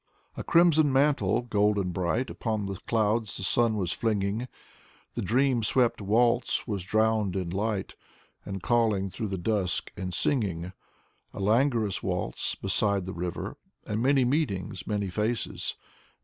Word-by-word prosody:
A - - -5
crimson 165 -4 +4
mantle, 135 -7 +2
golden 105 -4 +1
bright, 95 +8 -1
Upon 110 -3 -2
the 95 -1 -4
clouds 110 -1 +1
the - - -5
sun 115 +3 +3
was 90 -4 0
flinging; 110 +2 -1 0.7
The - - -3
dream 130 0 +2
swept 120 0 +2
waltz 115 +4 +2
was 100 -4 -2
drowned 110 -1 +1
in 90 -3 -2
light, 100 +1 -2 0.5
And 95 -2 -6
calling 110 -5 +2
through 110 +3 -4
the 95 -1 -3
dusk 95 0 -1
and 90 -1 -4
singing. 90 - -1 0.6
A - - -6
languorous 110 0 +2
waltz - - -2
beside 100 0 +1
the 95 - -5
river. 90 0 -4 0.3
And 105 +1 -2
many 135 0 +3
meetings, 100 - -1
many 100 -3 -1
faces. 110 +4 -2
105 Hz, 140 wpm, -28 LUFS, 95-120 Hz, 0.7 s, crimson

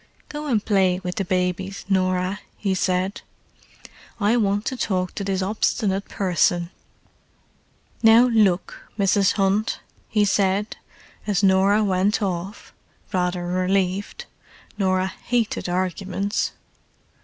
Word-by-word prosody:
"Go 300 0 -5
and 225 -7 0
play 190 -3 +2
with 180 -1 -4
the 195 - 0
babies, 185 +1 -2
Norah," 185 0 0 0.2
he 195 -2 -1
said. 185 +1 -1 1.0
"I 210 +2 +3
want 205 -2 +1
to 260 - -2
talk 185 -7 -1
to 200 - -4
this 195 -1 -1
obstinate 200 0 -1
person." 175 -2 +1 1.3
"Now 225 +2 +7
look, 205 -6 +1 0.2
Mrs. 200 -1 +3
Hunt," 200 +2 0 0.3
he 210 -1 +2
said, 200 +1 +1 0.5
as 205 -1 +1
Norah 195 +2 +4
went 195 +1 +1
off, 190 0 -4 0.4
rather 180 -1 0
relieved—Norah 185 - -2 0.2
hated 235 -6 0
arguments. 185 +2 -2
195 Hz, 110 wpm, -23 LUFS, 185-205 Hz, 1.3 s, Now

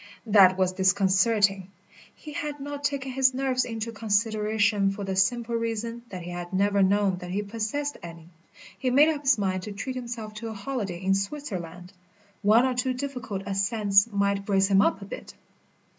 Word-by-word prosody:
That 195 -4 +6
was 185 -1 +2
disconcerting. 195 +1 +2 0.5
He 300 - -10
had 290 0 -4
not 285 +1 -6
taken 280 -2 -2
his 260 0 +2
nerves 260 -1 0
into 225 0 -4
consideration 210 -1 +1
for 195 +1 -5
the 190 -1 -3
simple 235 +5 +1
reason 230 0 -3
that 185 -2 -7
he 175 - -7
had 175 0 -6
never 200 +1 +2
known 195 -1 +2
that 180 0 -8
he 200 +3 -2
possessed 230 +8 -3
any. 170 -1 -11 0.5
He 260 - 0
made 285 +5 +5
up 300 -3 -2
his 270 -3 +3
mind 190 -2 -1
to 210 - -7
treat 255 +6 -5
himself 235 -3 -6
to 230 - -6
a 220 - -5
holiday 200 -4 -4
in 190 +1 +1
Switzerland. 195 - -5 0.5
One 220 +4 +5
or 260 - +1
two 250 +1 -1
difficult 250 -7 -5
ascents 200 +1 +2
might 200 0 0
brace 195 -1 +2
him 195 0 +5
up 200 -1 +1
a - - -8
bit. - - -9
210 Hz, 180 wpm, -26 LUFS, 195-245 Hz, 0.5 s, That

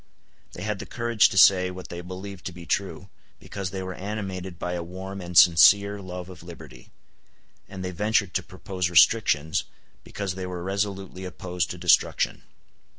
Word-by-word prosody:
They - - -8
had 105 -1 -3
the - - -7
courage 115 -3 +2
to 95 - -5
say 90 -1 +6
what 90 -1 -9
they 85 - -6
believed 95 +1 -8
to - - -5
be 85 -1 -11
true, 95 0 -3 0.3
because 100 -2 -6
they 95 0 -5
were 95 0 -5
animated 95 -3 -5
by 90 +2 -4
a 90 - -3
warm 95 +3 -7
and 90 -1 -4
sincere 100 +4 +6
love 90 -1 -7
of 90 -3 -12
liberty; 85 -2 -12 0.8
and 95 -1 -7
they 90 - -3
ventured 105 0 0
to 95 - 0
propose 90 0 -4
restrictions, 85 -4 +3 0.4
because 100 -2 -4
they 95 -1 -5
were 90 -1 -6
resolutely 95 -1 -3
opposed 90 -1 -4
to 90 - -6
destruction. 90 -1 +2
95 Hz, 170 wpm, -25 LUFS, 90-100 Hz, 0.8 s, say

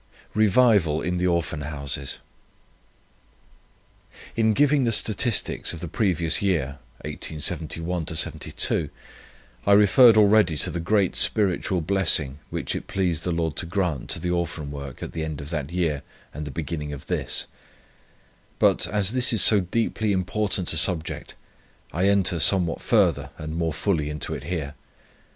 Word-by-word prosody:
REVIVAL 105 -7 +3
IN 90 +1 -2
THE 90 - +1
ORPHAN 85 -3 -1
HOUSES. 70 -1 -4 2.2
"In 110 -1 +2
giving 145 +3 +3
the 115 - +1
statistics 110 +1 +1
of 85 - -7
the 85 - -6
previous 85 -3 +1
year 75 -8 -1 0.2
[1871 80 +2 -3
72], 80 - -2 0.8
I - - +4
referred 110 +3 +6
already 105 -6 +4
to - - 0
the 85 - -4
great 95 +2 +1
spiritual 95 -3 +2
blessing, 80 -6 +2
which - - -3
it - - -6
pleased 90 -5 -1
the 90 - -2
Lord 80 -3 -2
to 85 - -2
grant 85 -7 -2
to - - +1
the 90 - -2
Orphan 85 -4 -3
Work 70 -2 -8
at - - -6
the 80 - -4
end 80 -2 -5
of 70 +1 -8
that 75 -4 -3
year 80 -6 -1 0.3
and 75 +2 -6
the - - -6
beginning 75 0 -5
of 70 - -9
this; - - -2 1.1
but, - - +3
as 105 -1 0
this 125 0 +3
is 110 -4 +3
so 105 - +6
deeply 110 +3 -1
important 95 -1 -1
a - - 0
subject, 80 0 -1 0.6
I 90 +4 +1
enter 95 -3 +2
somewhat 85 -1 +3
further - - +1
and 80 +1 -6
more 85 -1 -1
fully 80 -2 -1
into 75 0 -4
it - - -7
here. 80 -5 -4
85 Hz, 150 wpm, -24 LUFS, 80-100 Hz, 2.2 s, referred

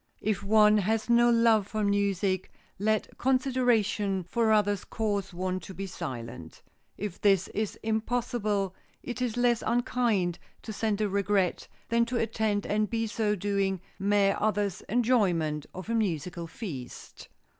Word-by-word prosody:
If 210 -2 0
one 210 +1 +5
has 220 +3 0
no 240 0 +5
love 230 -3 +4
for 215 0 -2
music, 200 -2 0 0.3
let 215 +1 -1
consideration 245 -7 +1
for 220 +5 +1
others 205 -2 +2
cause 205 -3 -2
one 185 +1 -2
to 190 - -10
be 195 - -4
silent. 120 - -7 0.3
If 205 -3 -5
this 195 -3 +3
is 215 -1 -3
impossible, 220 -3 -1 0.3
it 250 0 -5
is 245 -2 -1
less 240 -1 +3
unkind 235 -7 +1 0.2
to 220 - -6
send 215 0 -1
a 210 - +2
regret 200 -2 0 0.2
than 235 0 +3
to 240 +1 -2
attend 220 -2 0
and 210 0 0
by 225 -1 -1
so 215 -1 0
doing 195 -1 0 0.2
mar 200 0 +3
others' 205 -3 0
enjoyment 190 - +1
of 185 +2 -8
a 230 - -1
musical 175 -5 -1
feast. 155 - -8
210 Hz, 145 wpm, -28 LUFS, 190-225 Hz, 0.3 s, one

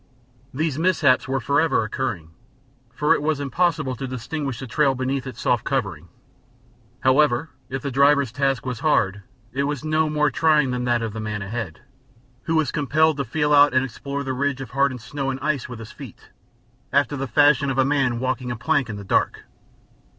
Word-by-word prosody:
These 155 +1 -2
mishaps 165 -7 +3
were 135 0 0
forever 145 +2 +2
occurring, 105 -8 -4 0.6
for 150 +3 +2
it - - -1
was 155 -1 0
impossible 145 -1 0
to 135 - -4
distinguish 130 +2 -4
the 135 - -6
trail 135 +3 +1
beneath 130 +1 -2
its 130 - -8
soft - - +1
covering. - - -2 0.9
However, 135 +2 +3 0.2
if 135 +2 -4
the 140 - -3
driver's 140 -1 +3
task 135 -1 0
was 125 -3 -4
hard 105 -10 +1 0.3
it 140 +2 0
was 145 0 -3
no 155 0 +1
more 150 -1 +1
trying 150 -3 +3
than 125 0 -2
that 120 -1 +1
of 110 -2 -4
the 110 - -5
man 105 -1 -4
ahead, 100 -6 -5 0.6
who 165 - 0
was 155 -4 +1
compelled 150 +2 +2
to 140 - -1
feel 150 +4 0
out 145 -2 +6
and 130 0 +3
explore 140 +3 -5
the 135 -1 -3
ridge 140 +1 -1
of 130 -3 -7
hardened 135 -2 0
snow 135 +2 -4
and 135 0 -3
ice 145 -4 -2
with 120 - -7
his 110 -1 -10
feet, - - -12 0.6
after 140 0 +2
the 135 0 -3
fashion 140 +2 +4
of 135 - -2
a 130 - +4
man 135 -4 +1
walking 130 0 -2
a 120 - -2
plank 140 +1 0
in 110 - -4
the 100 - -7
dark. 95 - 0
135 Hz, 195 wpm, -23 LUFS, 125-145 Hz, 0.9 s, out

